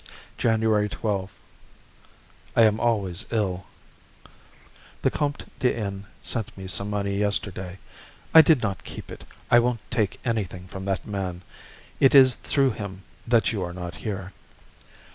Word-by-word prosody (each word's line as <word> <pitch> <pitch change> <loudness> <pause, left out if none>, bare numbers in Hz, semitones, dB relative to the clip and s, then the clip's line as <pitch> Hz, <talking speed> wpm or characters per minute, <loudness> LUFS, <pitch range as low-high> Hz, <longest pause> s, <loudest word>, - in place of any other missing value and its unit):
January 110 -2 +2
12. 100 -2 -3 1.2
I 115 - +6
am 110 0 +4
always 100 -7 0
ill. 95 -5 -1 1.4
The - - +3
Comte 145 -1 -2
de 125 - +2
N. 100 -2 -4 0.2
sent 110 -5 -3
me 95 - -7
some 100 +2 -1
money 100 -1 -1
yesterday. 95 -3 -1 0.6
I 160 - +12
did 155 -6 +4
not 100 -3 -2
keep - - -9
it. - - -10 0.3
I 120 - +8
won't 120 -1 +1
take 110 -5 0
anything 95 -6 -2
from 95 +1 -7
that 95 -5 -1
man. 95 -3 -4 0.6
It 135 - +5
is 130 -2 +8
through 135 +1 +1
him 100 -3 -7 0.2
that 115 -1 +3
you 105 -4 -2
are 90 -1 -3
not 90 -1 -6
here. 95 -3 -5
105 Hz, 145 wpm, -25 LUFS, 95-115 Hz, 1.4 s, I